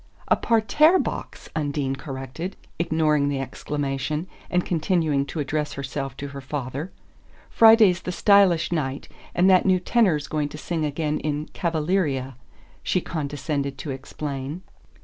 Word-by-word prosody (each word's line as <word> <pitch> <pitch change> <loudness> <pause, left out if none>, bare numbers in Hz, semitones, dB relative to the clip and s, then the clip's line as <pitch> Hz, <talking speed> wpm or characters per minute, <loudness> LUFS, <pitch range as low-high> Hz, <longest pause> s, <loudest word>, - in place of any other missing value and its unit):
"A - - +6
parterre 240 - +4
box," - - -4
Undine 145 -3 -1
corrected, 135 +6 -6 0.2
ignoring 155 -3 +2
the 140 -1 -1
exclamation, 145 +3 -3 0.2
and 180 0 +1
continuing 160 -4 +1
to 160 - -5
address 150 +1 -2
herself 135 -1 -5
to 140 0 -5
her 140 0 -8
father. 135 +4 -4 0.6
"Friday's 220 -6 +6
the 180 - -4
stylish 190 -4 +4
night, 140 -5 -2 0.3
and 180 +2 +4
that 185 0 +5
new 185 -1 +4
tenor's 180 -6 +2
going 150 -2 -1
to 150 - -9
sing 160 0 -2
again 150 +1 -1
in 150 0 -2
'Cavaleeria,'" 155 -6 0 0.5
she 185 - +1
condescended 145 -3 -3
to 140 +2 -5
explain. 140 +4 -5
150 Hz, 135 wpm, -24 LUFS, 140-175 Hz, 0.6 s, A